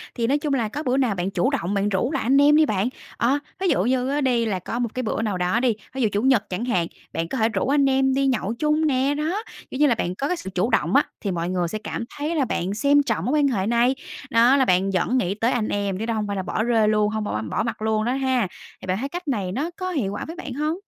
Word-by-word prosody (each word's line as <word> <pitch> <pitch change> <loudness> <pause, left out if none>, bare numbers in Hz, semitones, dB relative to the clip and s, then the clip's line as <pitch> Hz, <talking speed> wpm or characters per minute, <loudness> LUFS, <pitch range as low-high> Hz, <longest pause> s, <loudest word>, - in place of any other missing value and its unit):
Thì 230 -1 0
nói 280 +4 +3
chung 290 -1 -1
là 240 -5 +1
có 295 +8 -5
bữa 255 -1 +1
nào 250 -7 +1
bạn 180 +1 -2
chủ 255 - +1
động 205 -10 -2
bạn 200 0 +1
rủ 205 +7 0
lại - - -1
anh 260 +4 +3
em 295 +1 +6
đi 310 0 +6
bạn. 210 -3 0 0.3
Ờ, 265 +5 +2 0.2
ví 380 - 0
dụ 185 - +2
như 255 +3 +1
á 290 +1 0
đi 245 -4 +2
là 200 -4 -1
có 230 +6 -4
một 240 -1 0
cái 255 - -2
bữa 220 - -1
nào 210 -4 -1
đó 180 +5 +1
đi, 245 -2 +2 0.2
ví 265 - -3
dụ 220 - +3
chủ 205 - 0
nhật 260 -4 +2
chẳng 190 +6 -3
hạn, 180 -9 +1 0.3
bạn 165 0 -2
có 265 - -4
thể 220 -1 +2
rủ 230 - -1
anh 280 0 +3
em 265 0 +2
đi 275 +1 +2
nhậu 225 -5 0
chung 305 +1 +2
nè. 270 0 +2
Đó, 330 +9 -2 0.3
kiểu 260 - -5
như 295 - +5
là 245 - +3
bạn 180 -4 -2
có 275 - -2
cái 360 - -1
sự 190 - -7
chủ 185 +6 +1
động - - +1
á, 280 - +6 0.2
thì 200 - -2
mọi 170 -1 -2
người 180 -2 0
sẽ 215 +6 -4
cảm - - -4
thấy 300 +3 -2
là 285 -4 +2
bạn 190 -4 -2
xem 285 +6 +3
trọng 165 -10 -1
mối 255 - 0
quan 285 - +4
hệ 205 -7 0
này. 240 +3 +3 0.3
Đó 235 +3 +5
là 270 -2 +3
bạn 185 0 +2
vẫn 190 +7 +1
nghĩ 190 -6 0
tới 230 +3 +1
anh 225 -4 0
em, 200 -2 -1
chứ 220 - -2
đó 230 - -1
hông 215 -2 -2
phải 200 - -2
là 190 - -2
bỏ 215 - -1
rơi 225 -2 +3
luôn, 210 -1 +2
hông 215 0 -2
bỏ 105 - -2
bỏ 110 - -2
mặt 230 -1 -4
luôn 215 0 +1
đó 245 - +1
ha. 260 -5 +1 0.3
Thì - - -9
bạn 185 0 0
thấy 270 +6 -3
cách 355 +2 -6
này 205 -9 -1
nó 285 - -2
có 370 -1 -3
hiệu 250 - -1
quả 205 - -4
với 325 - -7
bạn 320 -7 -6
hông? 305 +5 -1
235 Hz, 305 wpm, -23 LUFS, 205-275 Hz, 0.3 s, em